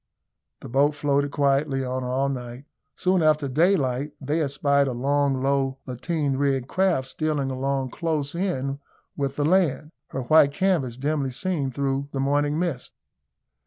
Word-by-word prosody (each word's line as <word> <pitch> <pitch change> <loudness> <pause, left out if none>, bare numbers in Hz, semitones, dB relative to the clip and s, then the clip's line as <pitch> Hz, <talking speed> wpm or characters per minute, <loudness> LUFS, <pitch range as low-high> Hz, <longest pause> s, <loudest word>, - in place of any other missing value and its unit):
The - - -8
boat 140 +4 +2
floated 145 -1 +1
quietly 140 -1 +1
on 130 0 -3
all 130 +2 0
night. 125 0 -6 0.3
Soon 185 -1 +1
after 155 -2 +3
daylight 145 -2 +1
they 150 +4 -1
espied 140 -1 +2
a 130 - -2
long, 135 +1 +1
low, 135 -1 +1
lateen 140 +2 -2
rigged 135 -2 0
craft 180 -7 +1
stealing 150 -4 -1
along 135 0 -2
close 155 -4 -2
in 140 -7 -2 0.4
with 140 -1 -2
the 145 - 0
land 155 -4 +2 0.2
her 135 - -4
white 140 +2 +5
canvas 160 -10 0
dimly 140 0 -1
seen 140 +2 -2
through 140 +1 -2
the 135 - -2
morning 145 +2 +1
mist. 165 -8 -3
140 Hz, 150 wpm, -24 LUFS, 135-150 Hz, 0.4 s, white